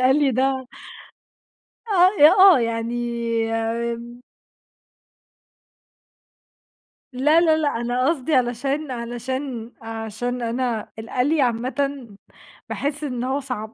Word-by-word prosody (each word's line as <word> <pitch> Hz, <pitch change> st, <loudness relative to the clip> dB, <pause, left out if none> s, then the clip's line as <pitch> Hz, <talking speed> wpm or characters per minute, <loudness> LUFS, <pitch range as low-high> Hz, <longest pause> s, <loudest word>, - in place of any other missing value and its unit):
القلي 270 Hz, +2 st, +3 dB
ده 255 Hz, +3 st, +1 dB
آه 265 Hz, -2 st, -1 dB, 1.5 s
أ 300 Hz, +2 st, +9 dB, 0.2 s
آه -, -, +3 dB
يعني 230 Hz, +1 st, -2 dB, 0.5 s
آمم. 235 Hz, +2 st, -3 dB, 2.9 s
لا، 300 Hz, +6 st, +3 dB
لا، 315 Hz, -2 st, +4 dB
لأ 305 Hz, -2 st, 0 dB
أنا 245 Hz, +3 st, 0 dB
قصدي 305 Hz, -2 st, 0 dB
علشان 260 Hz, +4 st, -1 dB
علشان 240 Hz, 0 st, -5 dB
عشان 225 Hz, +2 st, -4 dB
أنا 235 Hz, -1 st, -2 dB
القلي 255 Hz, +7 st, 0 dB
عامةً، 260 Hz, +2 st, -1 dB, 0.6 s
باحس 290 Hz, +1 st, -3 dB
إن 250 Hz, -4 st, -3 dB
هو 265 Hz, +2 st, -1 dB
صعب 240 Hz, -5 st, -5 dB
250 Hz, 95 wpm, -22 LUFS, 235-275 Hz, 2.9 s, أ